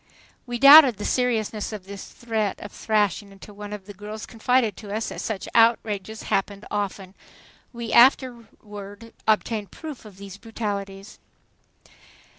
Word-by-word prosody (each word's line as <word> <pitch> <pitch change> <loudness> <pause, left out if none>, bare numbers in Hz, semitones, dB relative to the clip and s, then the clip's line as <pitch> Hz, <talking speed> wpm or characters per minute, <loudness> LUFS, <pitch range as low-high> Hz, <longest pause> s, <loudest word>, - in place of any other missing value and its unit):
We 240 0 -3
doubted 275 -3 +9
the 205 - -6
seriousness 225 -4 -1
of 210 -4 -8
this 200 0 -9
threat 220 -4 -3
of 205 - -9
thrashing 205 -2 -1
until 195 +1 -14
one 205 0 -9
of 205 -2 -8
the 205 - -10
girls 210 +2 -8
confided 235 -2 0
to 205 -2 -10
us 220 +2 -3
that - - -7
such 215 -4 -4
outrages 220 -2 +1
happened 200 +1 -2
often. 195 -2 -4 0.6
We 235 -2 -6
afterward 230 -4 +1
obtained 215 -1 0
proof 305 - -9
of 210 -4 -14
these 200 0 -10
brutalities. 200 -3 -6
210 Hz, 140 wpm, -24 LUFS, 200-230 Hz, 0.6 s, doubted